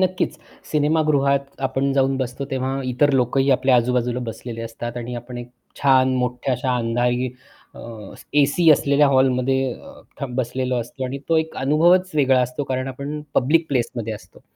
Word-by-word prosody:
नक्कीच, 185 -4 0 0.3
सिनेमागृहात 145 -3 +1
आपण 135 +1 0
जाऊन 135 0 +2
बसतो 130 +1 -3
तेव्हा 135 +1 -2
इतर 130 +3 +2
लोकंही 135 +1 +2
आपल्या 130 0 +3
आजूबाजूला 125 0 +1
बसलेले 115 +1 -7
असतात 115 +1 -6
आणि 120 0 -5
आपण 120 +1 -7
एक 120 0 -8 0.3
छान 130 -2 +4
मोठ्या 125 +1 -1
अशा 125 +1 -1
अंधारी 120 +2 0 0.5
अ, - - -11 0.6
एसी 145 +4 +4
असलेल्या 145 0 +4
हॉलमध्ये 130 0 +2 0.5
अ, - - -1
बसलेलो 130 +1 -2
असतो. 120 +3 -6
आणि 130 +2 -4
तो 165 - +3
एक 160 0 -3
अनुभवच 170 +7 +3
वेगळा 135 -3 +3
असतो, 125 +3 -2
कारण 130 0 -2
आपण 140 +3 -5
पब्लिक 160 +6 +3
प्लेसमध्ये 120 -4 -2
असतो. 105 - -12
130 Hz, 150 wpm, -21 LUFS, 125-140 Hz, 0.6 s, छान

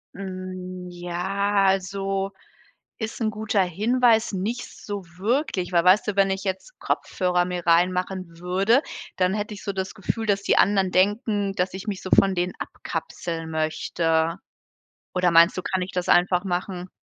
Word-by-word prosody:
Hm, 185 -1 -6
ja, 195 +3 0
also, 195 +1 0 0.7
ist 220 +1 -5
'n 220 - +1
guter 215 -2 0
Hinweis. 225 +5 +2
Nicht 220 +6 -3 0.2
so 205 -3 -5
wirklich, 210 - 0
weil, 170 -1 +4
weißt 185 +5 +5
du, 210 - -1
wenn 195 -1 +4
ich 190 0 -2
jetzt 195 - -4
Kopfhörer 180 -1 0
mir 180 -1 -4
reinmachen 180 0 +1
würde, 190 +8 +2 0.4
dann 185 +1 +2
hätte 210 0 -3
ich 200 - -11
so 200 - -2
das 190 +1 -4
Gefühl, 225 +2 -3
dass 200 -1 +1
die - - +2
anderen 195 -2 +3
denken, 205 +1 +1
dass 185 -1 -1
ich 190 +3 -7
mich 200 -3 -3
so 185 - -6
von 195 -1 +4
denen 180 +1 0
abkapseln 165 -2 -5
möchte. 160 +1 0 0.8
Oder 180 -1 +3
meinst 170 +2 +6
du, 185 - -3
kann 190 - -1
ich 185 - -5
das 180 -1 -2
einfach 180 0 +4
machen? 180 0 -3
190 Hz, 160 wpm, -24 LUFS, 180-200 Hz, 0.8 s, meinst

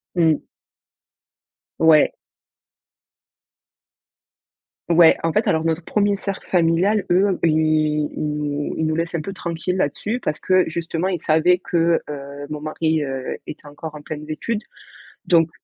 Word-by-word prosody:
Mmh. 165 -3 +3 1.4
Ouais. 160 -2 +5 2.8
Ouais, 170 -1 +7
en 165 - +1
fait, 215 +5 +1
alors 160 0 +2
notre 165 +1 -1
1er 205 -1 +1
cercle 195 -1 -5
familial, 180 +4 +2
eux, 190 +1 +3
ils 155 -2 +2
ils - - -4
nous 145 -1 -3
ils 160 - 0
nous 155 - 0
laissent 165 +1 -2
un 165 - -1
peu 195 - -6
tranquilles 175 0 -3
là-dessus 195 - -1
parce 155 - -3
que, 185 -1 +3
justement, 165 +2 -2
ils 185 -3 -2
savaient 160 +3 +3
que, 170 -1 +2
heu, 140 0 -7
mon 150 - -4
mari, 155 0 0
heu, 135 -2 -4
était 150 0 -9
encore 155 +2 -8
en 150 - -9
pleines 150 +1 -7
études 210 +8 -3 0.6
donc 165 -2 +4
160 Hz, 140 wpm, -21 LUFS, 155-180 Hz, 2.8 s, Ouais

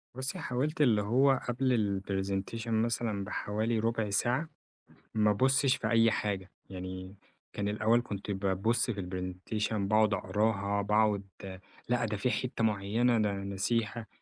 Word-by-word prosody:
بصي 130 +8 -3
حاولت 145 +2 -1
اللي 115 -7 +4
هو 130 +6 +3
قبل 120 -6 +1
الPresentation 95 +3 -3
مثلًا 115 -2 0
بحوالي 110 +3 -1
ربع 115 -1 0
ساعة، 125 +9 +1 0.7
ما 105 -1 +3
ابصش 130 +5 +3
في 110 - -3
أي 115 0 +5
حاجة. 95 -4 -2 0.2
يعني 95 0 -7 0.4
كان 100 - -2
الأول 110 +3 +2
كنت 100 -3 -5
بابص 100 +5 0
في 100 -3 -4
الPresentation 95 +4 -3
باقعد 110 +1 +2
أقراها، 100 +1 0
باقعد 105 0 +2 0.7
لأ، 120 -1 +2
ده 105 -1 -2
في 125 +5 0
حتة 125 -3 -2
معينة 110 +3 +2
ده 105 -1 +2
أنا 100 0 -4
ناسيها، 105 +3 -1
110 Hz, 140 wpm, -31 LUFS, 100-115 Hz, 0.7 s, أي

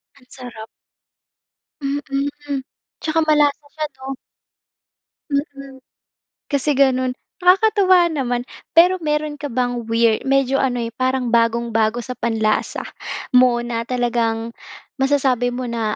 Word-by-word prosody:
Ang 260 -3 -22
sarap. 245 -4 -9 1.2
Mm. 285 0 -3 0.4
'Tsaka 320 0 0
malasa 295 -1 +3
siya 310 -1 -2
'no? 265 +1 -6 1.2
Mm. 275 -2 -4 0.7
Kasi 285 +1 +1
gano'n. 260 -2 +2 0.3
Nakakatuwa 375 -2 +5
naman. 245 -5 -1 0.3
Pero 355 +3 +7
meron 300 0 -1
ka 290 -1 -6
bang 245 -1 -1
weir 230 -1 +2
medyo 270 0 +2
ano, 250 -2 0
eh, 230 - -4
parang 255 -1 0
bagong-bago 230 -1 +2
sa 255 +1 -6
panlasa 220 -3 -1 0.5
mo 250 -1 +5
na 230 -1 -3
talagang 235 -2 -1 0.4
masasabi 265 -3 +2
mo 250 0 -4
na 225 -2 -2
260 Hz, 115 wpm, -20 LUFS, 235-285 Hz, 1.2 s, Pero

